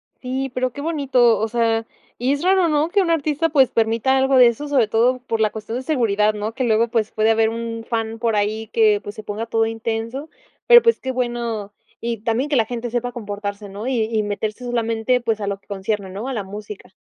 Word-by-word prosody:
Sí, 265 +1 -3
pero 255 0 -1
qué 285 - -8
bonito. 270 -7 +2
O 220 - 0
sea, 225 -1 0 0.3
y 255 +3 +1
es 285 - -3
raro, 375 -1 +4
¿no?, 305 +1 +1
que 400 +3 +3
un 345 -3 +1
artista, 315 0 +1
pues, 275 -4 +4
permita 230 +4 +1
algo 265 0 +3
de 250 - +8
eso, 235 +5 -2
sobre 265 -7 +2
todo 240 +4 +2
por 235 -3 -3
la 215 -1 +2
cuestión 220 +2 -5
de 260 - -5
seguridad, 215 -7 +1
¿no?, 210 +1 -4
que 260 +2 -2
luego, 230 0 +3
pues, 225 -2 -1
puede 220 0 +1
haber 220 0 +3
un 230 0 -5
fan 225 -1 -2
por 225 -1 0
ahí 215 +2 -1
que, 215 -3 +3
pues, 205 - -7
se 215 - -8
ponga 210 +2 -4
todo 225 -1 +1
intenso, 225 +5 -4 0.4
pero, 480 -1 +9
pues, 460 0 +3
qué 260 - -3
bueno. 235 -4 -3 0.3
Y 235 0 -2
también 235 +6 0
que 290 - +1
la 230 -3 +3
gente 240 +1 -4
sepa 245 +1 -2
comportarse, 205 -3 -6
¿no?, 200 +3 -7
y 265 - 0
y 220 -1 -1
meterse 210 +3 -4
solamente, 235 +1 0
pues, 225 -2 -1
a 200 - -3
lo 200 -1 -3
que - - -37
concierne, 200 0 -3
¿no?, 200 +6 -6
a 270 - -3
la 210 -5 -3
música. 205 +1 -9
230 Hz, 230 wpm, -21 LUFS, 215-255 Hz, 0.4 s, pero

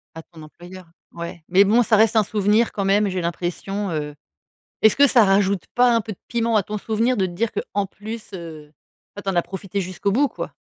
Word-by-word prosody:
À 160 - -8
ton 160 -1 -15
employeur, 175 +4 -13 0.3
ouais. 170 0 -8
Mais 190 +3 +5
bon, 225 +5 +4
ça 220 -1 +3
reste 225 +1 +3
un 215 - +4
souvenir 210 +3 +1
quand 200 - -3
même, 200 +1 +2
j'ai 185 -1 -2
l'impression, 180 +4 -3
heu 150 -2 -4 0.7
est 220 - +7
ce - - -4
que 285 0 +6
ça 240 -5 +5
rajoute 195 -1 +2
pas 245 -1 +4
un 230 - +1
peu 215 0 -6
de - - -13
piment 230 -2 0
à 205 - +3
ton 210 +3 -5
souvenir, 225 +4 0
de 190 - +1
te 185 - -3
dire 220 +6 -1
qu'en 200 -1 -3
plus, 215 +2 -9
heu, 160 -4 -9 0.5
ah 205 - -7
tu 195 - -2
en 190 - -3
as - - +5
profité 195 +2 -5
jusqu'au 185 +2 -2
bout 280 +5 +2
quoi? - - -7
200 Hz, 235 wpm, -22 LUFS, 180-220 Hz, 0.7 s, est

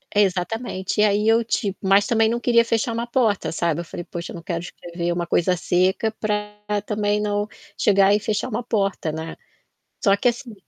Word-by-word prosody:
É, 210 - +6
exatamente. 190 +1 -1
E - - +6
aí, 210 +1 +2
eu, 225 +1 +4
tipo 200 -3 -2
mas 195 +1 +4
também 225 -1 +3
não 235 +1 -1
queria 235 -1 +4
fechar 230 0 0
uma 235 +1 -3
porta, 230 - +1
sabe. 170 -1 0
Eu - - -9
falei: 175 - -7
"Poxa, 170 -1 -6
eu - - -8
não 170 - -9
quero 170 -1 -3
escrever 175 0 -5
uma 175 0 -1
coisa 180 +2 +2
seca 185 +6 +1
pra 210 -1 -2 0.3
também 210 -1 0
não 205 0 -1 0.3
chegar 200 0 +4
e 210 - +3
fechar 210 +3 -2
uma 230 +2 -3
porta, 195 -8 -1
né". 160 +1 -6 0.7
Só 200 -2 +4
que, 245 - +2
assim, 240 -1 -4
205 Hz, 200 wpm, -22 LUFS, 180-225 Hz, 0.7 s, É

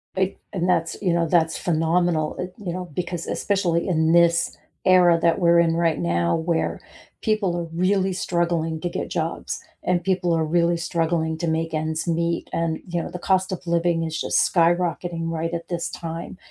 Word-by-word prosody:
Eh 190 0 +2 0.2
and 180 -1 -1
that's 165 -2 0
you 180 -4 +1
know, 170 -1 +1
that's 160 -1 +2
phenomenal, 165 -1 +1
eh, 180 - -2 0.2
you 175 -3 -3
know, 180 0 -4
because 175 -1 -3
especially 180 -4 0
in 160 -3 +2
this 170 0 +3 0.3
era 180 -2 +6
that 170 +3 +3
we're 170 -1 +5
in 165 -1 +3
right 165 -2 +1
now, 85 0 +1
where 165 0 -1 0.4
people 215 -5 +1
are 170 - -2
really 190 +1 +2
struggling 170 -3 -1
to 175 - -1
get - - -4
jobs, - - -3 0.2
and 175 -1 +1
people 180 -2 +1
are 160 -1 +1
really 170 +2 +2
struggling 160 -1 -1
to 170 - -2
make 160 0 -1
ends 160 +1 -2
meet, 170 0 -1
and, 165 -1 -1
you 175 -1 -1
know, - - -6
the 180 - -6
cost 190 +1 +1
of 180 -1 -6
living 170 0 +1
is 160 0 -3
just - - +2
skyrocketing 170 -1 +1
right 165 0 -2
at 170 0 -4
this 170 -1 -3
time, 165 +1 -6
170 Hz, 185 wpm, -23 LUFS, 165-180 Hz, 0.4 s, era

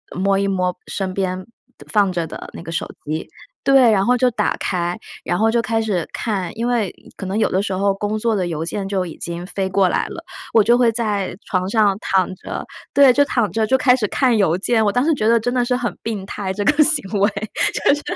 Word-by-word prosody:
摸 195 +1 +2
一 200 - 0
摸 180 -2 0
身 190 -2 -3
边 185 -1 -2 0.5
放 205 -3 +3
着 170 -2 -2
的 - - -8
那 - - -8
个 165 - -7
手 165 - -2 0.2
机， 155 +2 -3 0.4
对， 270 -4 +6
然 195 -2 +2
后 250 +1 +4
就 250 +1 +3
打 210 -2 0
开， 175 -1 -1 0.3
然 175 - 0
后 225 +1 +3
就 235 0 +2
开 225 0 0
始 195 -7 -1
看 200 -5 -3
因 235 +1 -1
为 230 -6 0 0.2
可 195 - -6
能 190 +3 -2
有 - - +2
的 190 - +1
时 195 -2 -3
候 195 +1 +1
工 205 +2 -2
作 225 +1 0
的 185 -3 -1
邮 160 -2 -3
件 195 +3 -3
就 190 -2 -1
已 165 - -8
经 170 +1 -5
飞 190 0 -2
过 190 -1 +3
来 - - 0
了， 335 - -8 0.3
我 220 - +6
就 235 +3 +4
会 240 -2 +4
在 205 -5 -2
床 185 -1 -1
上 205 -2 +3
躺 190 -1 +1
着 - - -6 0.3
对， 280 -2 +7
就 285 +3 +3
躺 240 -6 0
着 220 -1 0
就 265 - +3
开 255 -1 +4
始 220 -5 -1
看 245 +1 +2
邮 175 -4 +2
件。 220 +3 +1
我 205 - +3
当 245 +5 +1
时 325 - +3
觉 215 -4 0
得 230 0 +5
真 245 +2 -2
的 245 -1 +1
是 250 - +1
很 245 -1 -2
病 215 -4 -4
态 195 -1 -4
这 205 +1 -2
个 300 +8 +3
行 250 - 0
为， 200 +2 +4 0.4
就 - - +3
是 290 - -3
205 Hz, 260 characters per minute, -20 LUFS, 185-235 Hz, 0.5 s, 对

